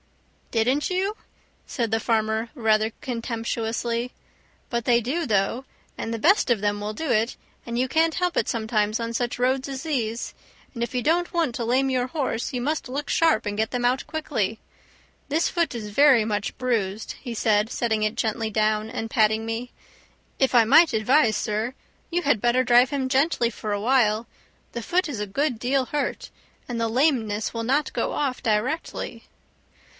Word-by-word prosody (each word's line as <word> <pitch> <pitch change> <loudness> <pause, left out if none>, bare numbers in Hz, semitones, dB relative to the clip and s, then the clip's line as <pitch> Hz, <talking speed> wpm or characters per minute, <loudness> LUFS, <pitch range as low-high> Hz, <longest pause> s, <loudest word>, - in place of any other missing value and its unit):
"Didn't 250 +6 +1
you?" 380 +3 -1 0.5
said 230 -4 -2
the 225 - +2
farmer 220 0 0
rather 220 -3 +2
contemptuously; 235 -1 -2 0.6
"but 235 -1 -1
they 235 0 +4
do, 285 +9 -2
though, 210 +4 +1 0.3
and 225 - -4
the 230 - -3
best 380 - +4
of 235 -3 +3
them 205 0 -1
will 210 +1 -3
do 320 +6 -4
it, 225 +1 +1 0.3
and 240 +2 -1
can't 320 +2 +2
help 360 -2 0
it - - +1
sometimes 220 -2 0
on 230 0 -3
such 240 +1 -1
roads 260 +2 +1
as 270 +1 -5
these. 240 -8 -2 0.4
And 235 -2 -3
if 240 - -4
you 250 - +1
don't 345 +5 +1
want 330 -8 0
to 235 - -2
lame 260 +3 +2
your 255 -1 0
horse 260 -5 -2
you 250 - -3
must 300 0 -2
look 280 +3 -4
sharp 325 -9 +3
and 205 0 -2
get 220 +1 -1
them 245 -1 -1
out 255 +2 +1
quickly. 230 -9 -2 0.7
This 315 +4 +2
foot 340 -5 0
is 220 -3 -5
very 265 -2 +5
much 210 -2 -2
bruised," 220 -5 -1
he 240 -3 -6
said, 215 -1 +2
setting 225 -3 -1
it 215 +1 0
gently 220 0 -1
down 215 0 +1
and 225 0 -4
patting 220 0 +2
me. 230 +2 -4 0.7
"If 265 -1 +2
I 235 -2 +7
might 300 +7 +6
advise, 220 +1 +3
sir, 220 +5 -2 0.3
you 350 +1 -1
had 280 -8 +2
better 240 +2 +3
drive 245 +1 +5
him 275 -2 -1
gently 260 -3 +2
for 215 -1 -5
awhile; 215 +1 +2 0.5
the 235 - -4
foot 360 +8 +1
is 265 -8 -5
a 210 - -3
good 255 +3 -1
deal 260 +2 +1
hurt, 295 +3 -3 0.4
and 235 -2 -3
the 230 - +1
lameness 225 -5 +1
will 230 -1 -3
not 275 +6 0
go - - -1
off 270 -4 -2
directly." 235 +8 -2
240 Hz, 180 wpm, -24 LUFS, 220-270 Hz, 0.7 s, I